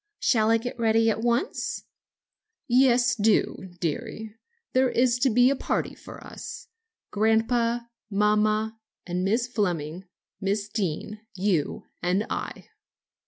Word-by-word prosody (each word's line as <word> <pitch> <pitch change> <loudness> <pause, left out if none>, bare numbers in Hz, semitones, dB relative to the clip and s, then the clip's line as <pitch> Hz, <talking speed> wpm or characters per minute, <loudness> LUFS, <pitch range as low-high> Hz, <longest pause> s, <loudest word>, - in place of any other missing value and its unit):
shall 220 -3 +2
I 230 - +5
get 245 +1 -6
ready 225 0 +3
at 220 - -3
once?" 240 - -1 0.8
"Yes, 245 -1 +4
do, 210 -3 +1
dearie. 205 +6 -4 0.4
There 260 0 +4
is 245 0 +2
to 265 - +3
be 245 +3 +5
a - - +1
party - - -2
of - - -15
us - - -9 0.4
grandpa, 230 +2 +2 0.3
mamma, 215 +2 +1 0.3
and 180 0 -2
Miss 225 +5 +1
Fleming, 180 -7 -2 0.3
Miss 200 +1 -1
Deane, 210 +1 -3
you 185 -5 0 0.2
and 185 +5 +1
I." - - -5
220 Hz, 120 wpm, -26 LUFS, 200-240 Hz, 0.8 s, I